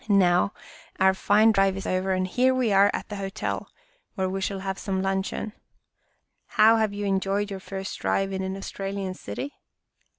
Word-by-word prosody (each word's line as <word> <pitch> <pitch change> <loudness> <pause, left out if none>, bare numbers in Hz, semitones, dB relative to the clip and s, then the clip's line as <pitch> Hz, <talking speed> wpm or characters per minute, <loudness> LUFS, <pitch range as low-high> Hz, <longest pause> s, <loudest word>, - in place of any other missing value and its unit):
Now, 185 -1 +4 0.5
our 190 0 +5
fine 210 +3 +4
drive 195 -2 +2
is 195 - -5
over 185 +1 0
and 185 0 0
here 255 +7 +2
we 250 -4 +1
are 200 +1 +6
at - - -5
the 205 - -5
hotel, 195 +1 -4 0.5
where 190 -1 0
we 195 +1 -3
shall 195 0 -2
have 190 0 -3
some 190 -1 -2
luncheon. 195 +2 -2 1.0
How 220 +1 +7
have 220 -2 +1
you 205 0 -4
enjoyed 195 +1 0
your 195 - -4
first 190 0 -6
drive 195 0 0
in 190 - -2
an 190 0 -3
Australian 195 -1 -4
city? 275 +8 -6
195 Hz, 175 wpm, -26 LUFS, 190-205 Hz, 1.0 s, How